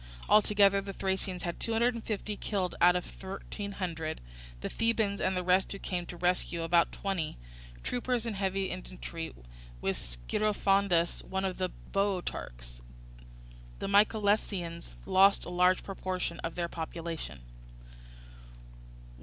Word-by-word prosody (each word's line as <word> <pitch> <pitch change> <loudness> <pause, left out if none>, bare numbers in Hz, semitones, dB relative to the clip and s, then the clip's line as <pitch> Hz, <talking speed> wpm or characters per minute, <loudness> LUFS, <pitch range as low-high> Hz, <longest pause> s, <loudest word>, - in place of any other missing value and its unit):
Altogether 205 -2 +5
the 195 0 -6
Thracians 190 -1 -2
had 170 -1 -3
two 230 - 0
hundred 235 +2 +3
and 230 -1 -6
fifty 210 -1 -3
killed 195 -3 -1
out 180 +1 +7
of 180 - 0
thirteen 200 +1 -6
hundred, 165 -5 -3 0.4
the - - -2
Thebans 220 -3 +1
and 185 0 +1
the 180 - 0
rest 185 +1 +3
who 195 - -4
came 180 -3 -3
to - - -7
the - - -13
rescue 175 -1 +1
about 170 +1 +4
twenty, 190 - -2 0.5
troopers 245 -1 -1
and 225 -3 -2
heavy 195 -1 0
infantry, 170 -3 -6 0.5
with - - 0
Scirphondas, 190 - +1
one 190 0 -2
of 190 -1 -2
the 185 -1 +1 0.2
Boeotarchs. - - -2 1.0
The - - -3
Mycalessians 200 -4 +2
lost 195 +1 +5
a - - -6
large 180 +1 +3
proportion 185 -3 -3
of 165 - -4
their 175 -1 -1
population. 165 - -5
185 Hz, 135 wpm, -31 LUFS, 170-200 Hz, 1.0 s, out